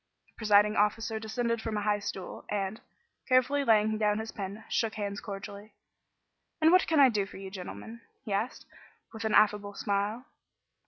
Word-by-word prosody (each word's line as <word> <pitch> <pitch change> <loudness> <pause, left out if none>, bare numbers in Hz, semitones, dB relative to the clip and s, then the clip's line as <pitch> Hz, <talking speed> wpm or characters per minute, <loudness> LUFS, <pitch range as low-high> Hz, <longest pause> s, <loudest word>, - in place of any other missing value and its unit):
The - - -32
presiding 210 -1 +4
officer 220 +2 +1
descended 230 +1 -2
from 220 -1 -3
a 205 - -2
high 205 0 +1
stool, 190 -2 -6
and, 200 +1 -2 0.5
carefully 260 +3 +3
laying 215 -3 +3
down 210 -1 +2
his 220 0 -5
pen, 200 +2 -6
shook 225 -2 -1
hands 205 -1 -3
cordially. 200 0 -8 0.9
"And 320 0 +5
what 370 +1 +5
can 320 -2 +2
I 270 -2 +8
do 205 -4 -1
for - - -11
you 190 0 -8
gentlemen?" 215 +4 -8 0.2
he 210 - -3
asked, 215 +6 -2 0.5
with 220 0 -6
an 220 - +1
affable 205 -1 +3
smile. 205 +5 -1
215 Hz, 170 wpm, -29 LUFS, 205-225 Hz, 0.9 s, I